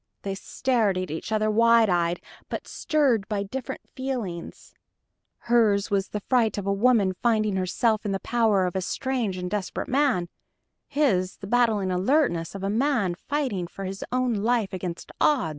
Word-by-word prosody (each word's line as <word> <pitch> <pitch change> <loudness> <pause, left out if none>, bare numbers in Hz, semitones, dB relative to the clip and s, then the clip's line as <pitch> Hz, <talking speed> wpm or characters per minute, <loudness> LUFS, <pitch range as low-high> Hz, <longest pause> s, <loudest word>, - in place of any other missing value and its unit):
They 195 - -2
stared 215 0 0
at 185 -3 -3
each 160 +7 -5
other 215 0 +2
wide 230 +1 +5
eyed 175 -2 +1 0.3
but - - -5
stirred 265 -10 +1
by 205 -2 -1
different 250 +5 -6
feelings. 245 -11 -5 0.7
Hers 215 -4 +2
was 195 -1 +1
the 210 - -4
fright 230 -1 +1
of 200 - -3
a 200 - +1
woman 205 -2 +3
finding 215 -4 +2
herself 215 +4 +1
in 205 - -2
the 195 - -1
power 220 -5 +2
of 180 - -3
a 190 - 0
strange 235 -1 -2
and 180 0 -4
desperate 195 0 -3
man; 255 -10 +2 0.6
his 205 -12 +1
the - - -9
battling 215 -4 +2
alertness 185 - +1
of 195 - -6
a - - 0
man 230 -5 +1
fighting 235 -4 -2
for 195 +2 -7
his 195 +1 -5
own 255 -1 +1
life 220 -1 0
against 180 -2 -5
odds. 265 - +3
210 Hz, 170 wpm, -25 LUFS, 190-245 Hz, 0.7 s, wide